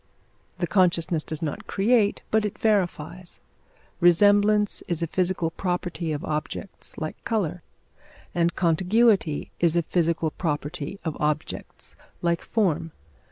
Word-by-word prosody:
The 175 - 0
consciousness 170 -3 +2
does 155 +1 -4
not 150 - -4
create, 210 +1 +2
but 220 0 +3
it 210 - -3
verifies. 180 -4 0 0.6
Resemblance 205 +4 +4
is 170 -1 -1
a - - +2
physical 175 -1 0
property 175 -2 -2
of 150 +4 -3
objects, 155 +4 -5
like 155 -1 -5
colour; 180 -7 -1 0.7
and 170 0 +1
contiguity 185 0 +2
is 170 -1 +3
a 170 - +3
physical 165 -2 0
property 150 +2 -3
of 160 - -2
objects, 150 0 -3 0.3
like 170 -1 +1
form. 165 -7 0
175 Hz, 120 wpm, -25 LUFS, 160-195 Hz, 0.7 s, Resemblance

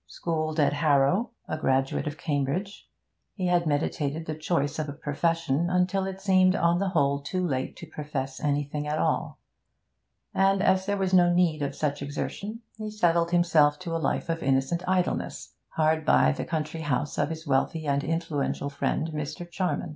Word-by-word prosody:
Schooled 155 -1 -2
at 145 - +3
Harrow, 145 - +2 0.2
a 155 - -3
graduate 135 0 +1
of 150 0 -4
Cambridge, 145 +8 -2 0.5
he 185 - -2
had 175 -2 +2
meditated 145 +1 -1
the 155 - -3
choice 155 -1 -1
of 150 -1 -2
a - - -4
profession 165 +2 0
until 185 +1 +1
it 190 0 -5
seemed, 185 -1 +4
on 170 -1 +2
the 195 0 0
whole, 140 -5 +2
too 185 +5 -2
late 130 -5 -2
to - - -9
profess 145 -4 -5
anything 145 0 -1
at 150 +1 -1
all; - - 0 1.0
and, 195 0 +3
as 190 0 +2
there 200 0 +1
was 190 -1 -1
no 175 -1 +6
need 175 -4 +2
of 140 -1 -2
such 145 -2 -1
exertion, 200 +10 -4 0.2
he 215 0 -4
settled 170 -5 +2
himself 165 -4 +4
to 165 0 -4
a 165 - -1
life - - -1
of 165 0 -2
innocent 135 +5 +1
idleness, 185 -1 -1
hard 155 0 +1
by 70 - +4
the - - -4
country 160 0 -3
house 145 -1 -1
of 145 0 +1
his 160 0 -6
wealthy 145 +3 0
and 140 0 +1
influential 155 -3 -2
friend, 150 +3 -1
Mr. 150 +3 -5
Charman. 180 -1 -2
160 Hz, 175 wpm, -27 LUFS, 145-180 Hz, 1.0 s, no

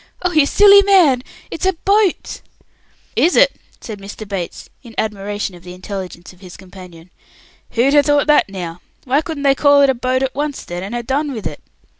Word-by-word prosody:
Oh 360 - 0
you 310 -4 +3
silly 400 +2 +7
man! 360 -11 +4 0.3
It's - - -7
a 380 - +2
boat!" 395 +2 0 0.7
"Is 345 - +2
it?" - - +4 0.3
said 215 -3 -8
Mr. 200 +2 -9
Bates, 190 -4 -6
in 235 -3 -14
admiration 205 -1 -3
of 175 - -14
the 180 +1 -11
intelligence 185 -2 -8
of 180 - -22
his 185 -2 -12
companion. 180 -2 -14 0.6
"Who'd 245 +4 +2
ha' 295 - +6
thought 290 0 +2
that 300 -8 +3
now? 175 -3 -7 0.2
Why 275 +3 +1
couldn't 315 -3 -6
they 275 -1 +4
call 285 0 +4
it 275 - +4
a - - -2
boat 255 +1 -1
at 265 - -2
once, 290 0 -4
then, 175 0 -6
and 200 +5 -6
ha' 240 -1 -4
done 285 +3 -1
with 220 -4 -7
it?" 150 -2 -6
250 Hz, 200 wpm, -17 LUFS, 190-295 Hz, 0.7 s, silly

